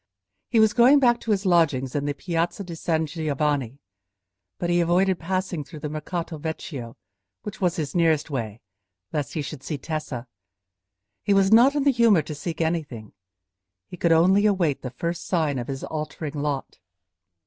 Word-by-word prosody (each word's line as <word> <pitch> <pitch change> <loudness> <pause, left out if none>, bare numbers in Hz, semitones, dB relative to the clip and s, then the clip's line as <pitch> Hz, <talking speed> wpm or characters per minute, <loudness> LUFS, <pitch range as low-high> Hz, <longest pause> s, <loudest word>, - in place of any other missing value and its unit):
He 230 - +3
was 220 -1 +5
going 250 +5 +6
back 240 -3 +3
to - - -8
his 205 -1 +1
lodgings 150 -8 +2
in 145 -1 -1
the 145 0 -2
Piazza 170 +4 -2
di 175 -2 -8
San 160 -1 0
Giovanni, 145 -5 -1 0.8
but 175 - -1
he 175 - +3
avoided 180 +2 +2
passing 185 -2 -2
through 155 +1 -11
the 150 - -3
Mercato 160 +1 -4
Vecchio, 145 -6 -6 0.5
which 210 0 -8
was 180 -2 +2
his 150 -4 -3
nearest 160 -3 +2
way, 115 -5 -4 0.5
lest 145 -4 -2
he 155 - -2
should 140 -1 -7
see 150 +1 -4
Tessa. 140 -4 -5 1.0
He 200 -1 +2
was 195 0 +4
not 255 +5 +6
in 290 - +1
the 280 - +5
humour 230 - +4
to 150 - -6
seek 160 +3 -5
anything; 150 -10 -3 0.7
he - - -10
could 170 -1 +1
only 190 +6 +5
await 175 -9 +1
the 130 - -5
first 170 +7 -4
sign 155 -7 0
of 120 - -5
his 135 -1 -5
altering 155 -1 -5
lot. 145 -2 -3
165 Hz, 175 wpm, -24 LUFS, 145-185 Hz, 1.0 s, going